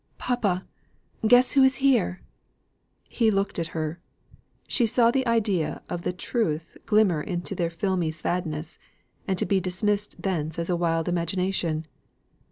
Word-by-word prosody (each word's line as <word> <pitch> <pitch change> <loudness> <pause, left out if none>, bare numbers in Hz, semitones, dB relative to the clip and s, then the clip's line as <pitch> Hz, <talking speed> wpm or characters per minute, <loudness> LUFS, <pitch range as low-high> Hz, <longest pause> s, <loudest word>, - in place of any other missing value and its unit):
"Papa! 205 -7 0 0.6
guess 245 +2 +6
who 275 - +5
is 265 0 +5
here!" 240 -9 +2 0.8
He 230 -2 +2
looked 195 -3 0
at 165 - -1
her; 155 +2 -3 0.7
she 235 - +2
saw 235 +1 +4
the 260 0 0
idea 205 -8 0
of 175 - -3
the 180 - -1
truth 175 -4 -2
glimmer 210 -8 +3
into 175 +3 -4
their 175 -3 -1
filmy 175 -1 -1
sadness, 160 -1 -3 0.5
and 190 -2 0
be 195 - +3
dismissed 200 +3 -1
thence 160 -5 -2
as 170 +1 -2
a - - +2
wild 165 -1 0
imagination. 175 -2 -1
185 Hz, 140 wpm, -26 LUFS, 170-215 Hz, 0.8 s, guess